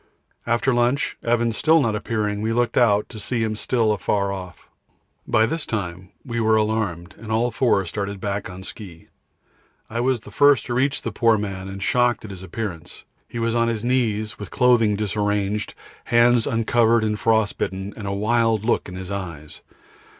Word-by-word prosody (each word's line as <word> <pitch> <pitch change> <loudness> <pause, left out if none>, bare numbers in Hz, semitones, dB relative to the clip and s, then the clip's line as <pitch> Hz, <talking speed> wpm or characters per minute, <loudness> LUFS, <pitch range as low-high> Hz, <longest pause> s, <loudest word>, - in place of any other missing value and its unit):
After 120 +2 +2
lunch, 120 +4 +1
and - - -4
Evans 115 -2 +1
still 160 +1 +4
not 115 -7 +1
appearing, 105 -2 -2
we 110 +1 0
looked 120 0 0
out, 105 -4 +3
to 110 - -9
see 115 +2 -1
him 110 -1 -1
still 115 0 +1
afar 100 0 0
off. 90 -3 -9 0.6
By 110 - +4
this 160 +6 -2
time 95 -3 -4 0.2
we 120 -1 -3
were 110 -1 +3
alarmed, 105 -5 -1
and 110 0 -7
all 115 +2 +1
four 115 -8 +2
started 100 +2 -4
back 100 0 -3
on 90 +1 -9
ski. 95 -5 -10 0.8
I 115 - -2
was 125 0 +1
first 145 -1 +3
to 120 - -3
reach 135 +3 0
the - - -3
poor 115 -2 +3
man 95 -2 -4
and 95 0 -6
shocked 120 0 +1
at 105 - -8
his 95 -2 -9
appearance; 95 -3 -6 0.2
he - - -8
was 115 0 0
on 115 0 +2
his 115 -1 -2
knees 110 -4 0
with 100 -4 -7
clothing 120 -4 +3
disarranged, 105 0 -1 0.3
hands 120 0 +4
uncovered 115 0 +2
and 105 -1 -1
frostbitten, 100 -3 0
and 105 - -7
a - - -1
wild 110 +1 +1
look 115 - 0
in 90 - -8
his 95 +1 -7
eyes. 85 -7 -6
110 Hz, 180 wpm, -22 LUFS, 100-120 Hz, 0.8 s, still